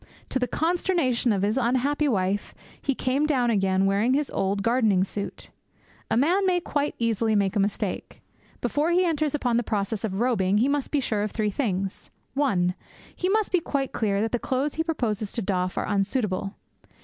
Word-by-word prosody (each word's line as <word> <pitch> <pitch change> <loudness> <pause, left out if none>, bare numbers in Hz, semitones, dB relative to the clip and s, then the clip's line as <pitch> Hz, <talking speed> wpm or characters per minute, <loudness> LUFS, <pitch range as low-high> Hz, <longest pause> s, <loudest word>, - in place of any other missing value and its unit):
To 260 - 0
the 250 - 0
consternation 325 -8 +1
of 195 -2 0
his 215 +6 +1
unhappy 260 +5 +1
wife 200 -4 -1 0.3
he 275 - 0
came 270 +5 +1
down 250 -5 +2
again 195 -2 +2
wearing 205 +6 +2
his 290 0 -1
old 195 +1 -1
gardening 225 -5 +3
suit. 200 +1 -6 0.6
A - - +2
man 345 +10 +3
may 360 -1 +3
quite 290 -4 -2
easily 225 -1 +1
make 200 -2 +1
a - - +2
mistake. 200 +1 -2 0.4
Before 300 +3 0
he 360 +1 +3
enters 310 -3 0
upon 245 -5 +1
the - - +3
process 205 -1 -2
of 195 -3 -2
robing 205 -5 +2
he 235 +5 +3
must 285 -1 0
be 290 - +1
sure 215 -4 -1
of 210 - -1
three 210 0 -1
things: 195 -5 -2 0.2
(1) 195 -11 +1 0.4
He 365 - -1
must 430 +1 +1
be 365 - +4
quite 280 -4 -2
clear 200 -3 0
that 225 - -1
the 245 - 0
clothes 270 +4 -1
he 320 - -1
proposes 225 - -2
to 235 - -1
doff 185 -1 -1
are - - 0
unsuitable. 200 -1 -1
235 Hz, 190 wpm, -25 LUFS, 200-285 Hz, 0.6 s, be